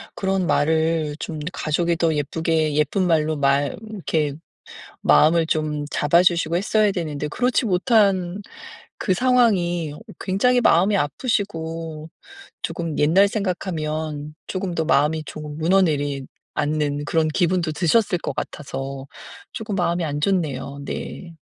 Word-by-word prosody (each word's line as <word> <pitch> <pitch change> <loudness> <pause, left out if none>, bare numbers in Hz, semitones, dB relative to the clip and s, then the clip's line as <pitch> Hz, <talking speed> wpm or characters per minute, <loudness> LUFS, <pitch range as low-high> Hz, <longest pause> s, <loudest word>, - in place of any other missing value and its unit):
그런 190 -1 0
말을 160 -1 +1
좀 160 -2 -5
가족이 170 +2 0
더 165 -1 +2
예쁘게 155 +1 0
예쁜 150 +5 +1
말로 155 -2 +2
말 140 0 +2 0.2
이렇게 160 -8 -1 0.7
마음을 160 - +5
좀 155 -2 -1
잡아 170 +4 +3
주시고 170 -2 +2
했어야 210 +3 +2
되는데 150 -5 -3
그렇지 245 - +1
못한 195 -2 +2 0.6
그 190 - +1
상황이 185 - +2
어 - - -11 0.2
굉장히 245 +6 +2
마음이 200 -1 +4
아프시고 165 - -2 0.5
쪼금 165 -3 -3
옛날 175 +7 +5
생각하면 155 -7 -3
쪼금 185 -2 -3
더 160 - 0
마음이 150 +2 +2
조금 150 0 -7
무너내리 155 -6 +1 0.3
앉는 145 -1 -1
그런 160 +1 +1
기분도 175 0 +1
드셨을 185 +4 +2
것 - - -4
같아서 135 -1 -5 0.5
쪼금 215 -2 -4
마음이 175 -2 0
안 145 -1 -3
좋네요. 145 -6 -1
네. 170 +3 -6
165 Hz, 275 characters per minute, -22 LUFS, 150-185 Hz, 0.7 s, 마음을